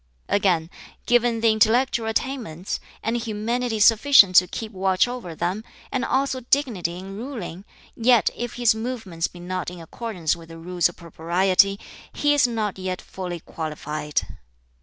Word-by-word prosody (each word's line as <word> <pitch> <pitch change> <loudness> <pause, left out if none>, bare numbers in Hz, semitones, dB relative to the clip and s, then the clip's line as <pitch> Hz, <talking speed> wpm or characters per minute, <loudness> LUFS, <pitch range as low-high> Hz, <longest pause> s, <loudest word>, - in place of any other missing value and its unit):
"Again, 180 -4 +1 0.3
given 240 -1 +2
the 225 -1 +5
intellectual 225 +2 +2
attainments, 225 - -3 0.2
and 225 +2 0
humanity 230 +1 -2
sufficient 215 -2 +6
to 180 - +7
keep 220 +3 -6
watch 190 +1 +2
over 245 -9 -6
them, 185 +7 -2 0.3
and 260 - -1
also 265 0 0
dignity 235 -10 0
in 190 +1 -8
ruling, 205 -6 -7 0.3
yet 240 -1 +4
if 240 -1 -5
his 240 -2 +4
movements 220 -8 -3
be 175 - -14
not 180 0 -4
in 180 0 -10
accordance 175 -1 -3
with 165 -1 -13
the 165 - -10
Rules 175 +1 0
of 175 - -13
Propriety, 185 +4 +2 0.3
he 290 0 +2
is 290 -3 +4
not 215 -5 -2
yet 185 -1 -3
fully 180 -3 -6
qualified. 150 -2 -3
205 Hz, 150 wpm, -23 LUFS, 175-240 Hz, 0.3 s, to